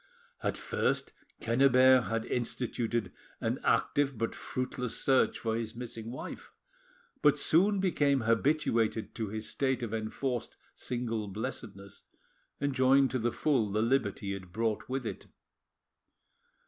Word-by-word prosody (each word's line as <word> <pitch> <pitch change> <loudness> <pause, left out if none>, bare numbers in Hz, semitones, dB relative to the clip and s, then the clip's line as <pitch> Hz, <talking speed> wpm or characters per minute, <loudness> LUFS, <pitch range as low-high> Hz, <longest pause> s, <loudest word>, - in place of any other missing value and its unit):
At - - -1
first - - -1 0.3
Quennebert 130 +1 +5
had 115 +3 -2
instituted 120 -3 -2 0.3
an - - -1
active 140 -3 +2
but 115 +1 -1
fruitless 125 -2 -3
search 135 -1 +3
for 110 -1 -2
his 115 -1 -4
missing 115 -2 -6
wife, 125 - -7 0.7
but - - +5
soon 195 +5 +3
became 145 -8 +2
habituated 115 -1 +1
to 110 -2 -3
his 110 +2 -5
state 130 -2 -1
of 115 -2 -4
enforced 115 +3 -3 0.2
single 115 -3 -3
blessedness, 100 -2 -7 0.6
enjoying 135 -1 +4
to 130 - -1
the 120 +1 0
full 125 -9 +1
the 110 +2 +1
liberty 105 -5 0
it 95 -2 -8
brought 110 +1 -1
with 130 -1 -2
it. - - -6
120 Hz, 125 wpm, -31 LUFS, 110-130 Hz, 0.7 s, Quennebert